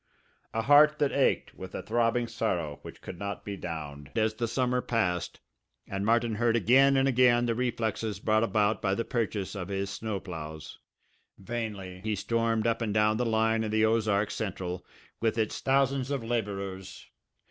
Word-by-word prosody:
A 115 - -1
heart 150 +4 +6
that 145 -2 +1
ached 140 - +1
with 95 -1 -9
a - - -4
throbbing 120 +1 +1
sorrow 85 -11 -2
which - - -11
could 90 - -8
not 100 0 -5
be 100 - -4
downed 75 -6 -6
as 110 -1 +2
the 115 +1 -2
summer 125 +1 0
passed 90 -9 -1 0.5
and 100 0 -3
Martin 115 +1 +2
heard 115 +1 +2
again 135 +5 +5
and 135 0 +3
again 120 -2 +4
the 115 - +1
reflexes 115 -4 -2
brought 110 +1 +2
about 110 -1 +1
by 95 -2 +1
the 115 - -2
purchase 110 -5 -2
of 95 -4 -5
his 100 0 -3
snow 110 -1 -3
ploughs. 80 -4 -8 0.6
Vainly 100 -4 -5
he 110 -1 -1
stormed 115 +1 0
up 115 0 +1
and 105 -2 -1
down 110 0 +3
the 125 - 0
line 110 0 +2
of 110 - -2
the 110 +1 +3
Ozark 110 -2 +1
Central 90 -4 -4 0.4
with 115 0 0
its 110 -2 -1
thousands 135 -1 +2
of 140 -4 -2
labourers. 100 -5 -4
110 Hz, 175 wpm, -29 LUFS, 100-120 Hz, 0.6 s, heart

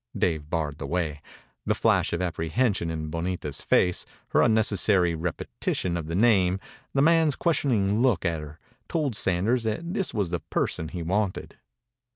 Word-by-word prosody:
Dave 80 -4 0
barred 75 -3 -2
the 70 - -4
way. 75 -3 -2 0.5
The - - +2
flash - - +2
of 85 +2 -1
apprehension 90 +3 0
in 80 -1 -4
Bonita's 85 -3 -3
face, 90 -1 +2 0.3
her - - +3
unnecessary 100 -5 +3
repetition 85 +1 -3
of 85 -3 -4
the 85 - -3
name, 95 -4 +3 0.4
the 135 - +4
man's 160 -2 +4
questioning 115 -11 +1
look 120 -9 +2
at 85 -2 0
her, 75 +1 -10 0.3
told 150 -8 -1
Sanders 100 +7 +1
that 165 +11 -2
this 195 -3 -1
was 100 -6 -1
the 85 - -1
person 80 - -2
he 85 +1 -5
wanted. 95 +3 -2
90 Hz, 160 wpm, -26 LUFS, 80-110 Hz, 0.5 s, the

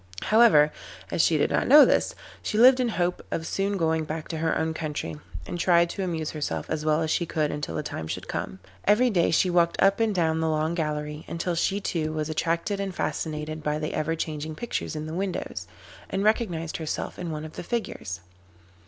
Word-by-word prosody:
However, 210 -10 +6 0.4
as - - +2
she - - +3
did - - +1
not - - +1
know 295 0 +9
this, - - +1 0.3
she 210 - -2
lived 255 +3 +7
in 250 -2 +1
hope 180 -4 -1
of 160 - -3
soon 195 +3 -1
going 160 -2 +1
back 155 +1 -5
to 160 - -3
her 160 0 +1
own 160 0 0
country, 155 -1 -4 0.3
and 175 - -5
tried 170 -1 +4
to 195 - -5
amuse 160 -4 -2
herself 150 -2 -4
as 155 -1 -1
well 155 +1 +2
as 160 - -1
she 170 - 0
could 155 -2 0
until 145 - -4
the - - -2
time 80 - -5
should - - -5
come. 95 - -4 0.3
Every 240 +4 +4
day 175 -5 +3
she 180 +3 +3
walked 170 -1 +2
up 195 +2 +4
and 220 -3 +1
down 160 -2 +1
the 160 0 +1
long 155 +1 0
gallery, 150 -2 -3
until 170 +1 -2
she 190 +4 0
too 155 -5 -2
was 155 0 -2
attracted 170 +5 -1
and 195 -2 -3
fascinated 155 +1 -3
by 150 0 -1
the 155 0 -3
ever 165 +2 -1
changing 155 -1 -4
pictures 235 -4 -4
in 155 0 -4
the 155 - -6
windows, 180 - -3 0.4
and 195 +1 -1
recognised 180 -7 0
herself 160 -2 -4
in 175 -2 -4
one 155 -1 -4
of 155 - -9
the - - -6
figures. 170 - -4
160 Hz, 215 wpm, -26 LUFS, 155-185 Hz, 0.4 s, know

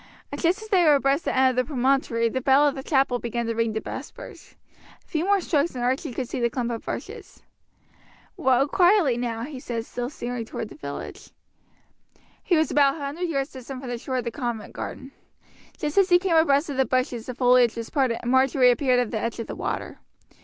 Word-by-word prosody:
Just 370 +6 0
as 435 - -11
they 375 -4 +4
were 300 -3 +6
abreast 275 +2 +1
the - - -1
end 260 0 +5
of - - -6
the 255 - +3
promontory 260 -4 +1
the 260 +3 -2
bell 275 +3 +4
of 285 - +1
the 270 - -6
chapel 265 -3 +1
began 235 0 -3
to 230 - -1
ring 230 -1 0
the 220 - -1
vespers. - - -9 0.4
A - - -37
few 320 +2 -2
more 400 0 +3
strokes 315 -4 0
and 245 - -3
Archie 255 +1 -1
could 250 +1 -4
see 260 - -4
the 235 -1 +1
clump 240 0 -3
of 230 - -5
bushes. - - -7 0.9
"Row 260 +1 +2
quietly 350 - +4
now," 235 -1 -3
he 275 0 -7
said, 230 -3 -4
still 245 0 -4
steering 245 -4 -5
toward 225 0 -6
the - - -12
village. 305 - -8 1.1
He 350 - +2
was 315 - +1
about 280 -2 +4
a - - -9
hundred 305 +5 -4
yards 275 -2 -2
distant 260 0 -8
from 255 -1 -7
the 240 - -4
shore 260 +2 -3
of 250 - -1
the 235 - -3
convent 235 -4 -4
garden. 265 +1 -7 0.7
Just 300 +5 0
as 385 - +3
he 355 - +7
came 355 -2 0
abreast 295 -2 +3
of 270 - -5
the 265 - +3
bushes 255 -3 -1
the 250 - -5
foliage 245 -2 +4
was 230 -1 -6
parted 260 -6 +1
and 240 - -1
Marjory 260 -1 +4
appeared 255 -1 +2
at 245 -3 -1
the 220 - -2
edge 230 +1 -3
of 230 - -3
the - - -7
water. - - -4
260 Hz, 225 wpm, -24 LUFS, 240-290 Hz, 1.1 s, he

